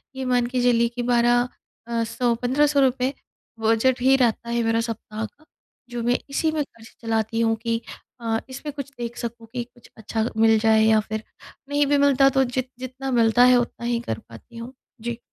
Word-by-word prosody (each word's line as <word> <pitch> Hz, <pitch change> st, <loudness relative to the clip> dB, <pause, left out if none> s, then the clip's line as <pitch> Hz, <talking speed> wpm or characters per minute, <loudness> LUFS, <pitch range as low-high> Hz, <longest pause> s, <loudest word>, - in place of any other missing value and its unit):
ये 265 Hz, -, -4 dB
मान 250 Hz, -1 st, +2 dB
के 250 Hz, 0 st, -1 dB
चलिए 235 Hz, -1 st, +4 dB
कि 240 Hz, +1 st, -5 dB
12 240 Hz, 0 st, +3 dB, 0.4 s
अ, 230 Hz, -1 st, 0 dB
100 235 Hz, +1 st, 0 dB
₹1500 265 Hz, 0 st, +2 dB, 0.5 s
बजट 225 Hz, +3 st, +2 dB
ही 265 Hz, +2 st, +5 dB
रहता 235 Hz, -2 st, +1 dB
है 235 Hz, 0 st, 0 dB
मेरा 225 Hz, 0 st, +1 dB
सप्ताह 225 Hz, -1 st, -5 dB
का। 300 Hz, +7 st, -16 dB, 0.4 s
जो 240 Hz, -1 st, -4 dB
मैं 245 Hz, +1 st, +2 dB
इसी 315 Hz, +3 st, 0 dB
में 310 Hz, -1 st, 0 dB
ख़र्च 225 Hz, -5 st, -17 dB
चलाती 225 Hz, 0 st, -1 dB
हूँ 225 Hz, -1 st, +2 dB
कि 230 Hz, -1 st, -1 dB, 0.4 s
अ, 225 Hz, -1 st, 0 dB
इसमें 290 Hz, +3 st, -6 dB
कुछ 280 Hz, -1 st, -7 dB
देख 235 Hz, 0 st, -5 dB
सकूँ 230 Hz, -1 st, -6 dB
कि 245 Hz, -, -2 dB
कुछ 240 Hz, 0 st, -20 dB
अच्छा 220 Hz, 0 st, -2 dB
मिल 225 Hz, 0 st, +5 dB
जाए। 220 Hz, 0 st, +4 dB
या 220 Hz, 0 st, +5 dB
फिर 220 Hz, 0 st, -3 dB, 0.5 s
नहीं 290 Hz, 0 st, +2 dB
भी 290 Hz, -, +3 dB
मिलता 280 Hz, -1 st, +5 dB
तो 265 Hz, -, +5 dB
जि 255 Hz, +1 st, -1 dB, 0.2 s
जितना 260 Hz, +1 st, -5 dB
मिलता 235 Hz, 0 st, +4 dB
है -, -, +6 dB
उतना 240 Hz, -1 st, -3 dB
ही 235 Hz, -1 st, 0 dB
कर -, -, -2 dB
पाती 235 Hz, -, -13 dB
हूँ। 235 Hz, +3 st, -8 dB, 0.3 s
जी। 235 Hz, 0 st, -4 dB
240 Hz, 195 wpm, -23 LUFS, 230-255 Hz, 0.5 s, है